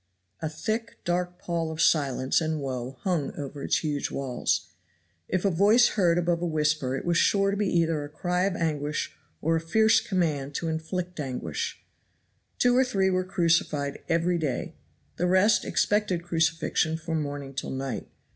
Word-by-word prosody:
A 160 Hz, -, -1 dB
thick, 220 Hz, +8 st, -3 dB
dark 180 Hz, 0 st, -1 dB
pall 170 Hz, -2 st, -2 dB
of 160 Hz, -, -7 dB
silence 140 Hz, -3 st, +2 dB
and 160 Hz, -1 st, -1 dB
woe 130 Hz, -1 st, -4 dB
hung 170 Hz, -7 st, -1 dB
over 140 Hz, 0 st, -6 dB
its -, -, 0 dB
huge 145 Hz, -2 st, -1 dB
walls. 130 Hz, -3 st, -1 dB, 0.6 s
If 185 Hz, +1 st, -1 dB
a 200 Hz, -, +4 dB
voice 205 Hz, +8 st, +5 dB
was -, -, -7 dB
heard 175 Hz, -5 st, +3 dB
above 175 Hz, -1 st, +1 dB
a 175 Hz, -, 0 dB
whisper 150 Hz, -4 st, 0 dB
it 135 Hz, -, -5 dB
was 170 Hz, -1 st, +2 dB
sure 195 Hz, -1 st, +3 dB
to -, -, -1 dB
be 205 Hz, -1 st, +1 dB
either 165 Hz, -3 st, +1 dB
a 145 Hz, -, -7 dB
cry 180 Hz, +3 st, 0 dB
of 195 Hz, -2 st, 0 dB
anguish 150 Hz, -2 st, -2 dB, 0.3 s
or 165 Hz, +1 st, +2 dB
a 165 Hz, -, 0 dB
fierce 220 Hz, +7 st, +4 dB
command 150 Hz, -7 st, -1 dB
to 165 Hz, -, -1 dB
inflict 170 Hz, +2 st, -4 dB
anguish. 125 Hz, -, -4 dB, 0.7 s
Two 245 Hz, 0 st, +4 dB
or 260 Hz, -, +5 dB
three 195 Hz, -7 st, +1 dB
were 185 Hz, 0 st, +1 dB
crucified 165 Hz, -5 st, +1 dB
every 170 Hz, +1 st, +2 dB
day; 140 Hz, -6 st, -2 dB, 0.4 s
the 180 Hz, -, +1 dB
rest 190 Hz, +4 st, +4 dB
expected 205 Hz, -5 st, +1 dB
crucifixion 165 Hz, -1 st, +1 dB
from 160 Hz, -1 st, -2 dB
morning 145 Hz, -1 st, -5 dB
till 135 Hz, -, -4 dB
night. 135 Hz, 0 st, -4 dB
165 Hz, 175 wpm, -27 LUFS, 145-180 Hz, 0.7 s, voice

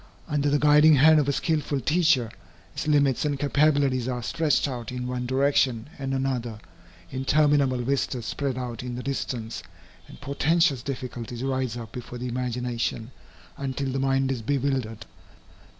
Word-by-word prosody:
Under 145 Hz, -2 st, 0 dB
the 145 Hz, -, +3 dB
guiding 150 Hz, +1 st, +6 dB
hand 155 Hz, +3 st, +6 dB
of 145 Hz, -1 st, +1 dB
a -, -, +3 dB
skilful 150 Hz, -1 st, -1 dB
teacher, 145 Hz, -5 st, +2 dB, 0.4 s
its -, -, -4 dB
limits 145 Hz, -4 st, +3 dB
and 145 Hz, -2 st, 0 dB
capabilities 140 Hz, -3 st, +2 dB
are 125 Hz, -2 st, -3 dB
stretched 160 Hz, +2 st, +1 dB
out 125 Hz, -4 st, -5 dB
in 125 Hz, 0 st, -4 dB
one 125 Hz, 0 st, -3 dB
direction 130 Hz, -2 st, +1 dB
and 135 Hz, 0 st, -2 dB
another, 125 Hz, -5 st, -2 dB, 0.5 s
interminable 140 Hz, 0 st, +2 dB
vistas 125 Hz, -2 st, -1 dB
spread 135 Hz, 0 st, -2 dB
out 120 Hz, -3 st, -5 dB
in 125 Hz, -1 st, -5 dB
the 125 Hz, -, -6 dB
distance, 120 Hz, -4 st, -4 dB, 0.5 s
and -, -, -13 dB
portentous 145 Hz, 0 st, +1 dB
difficulties 125 Hz, -2 st, -6 dB
rise 130 Hz, -3 st, -1 dB
up 115 Hz, -2 st, -8 dB
before 125 Hz, 0 st, -8 dB
the 125 Hz, +1 st, -4 dB
imagination, 125 Hz, -1 st, -3 dB, 0.5 s
until 135 Hz, 0 st, -3 dB
the 135 Hz, -, -2 dB
mind 135 Hz, 0 st, +1 dB
is 125 Hz, -3 st, -3 dB
bewildered. 130 Hz, -3 st, -2 dB
135 Hz, 150 wpm, -25 LUFS, 125-145 Hz, 0.5 s, guiding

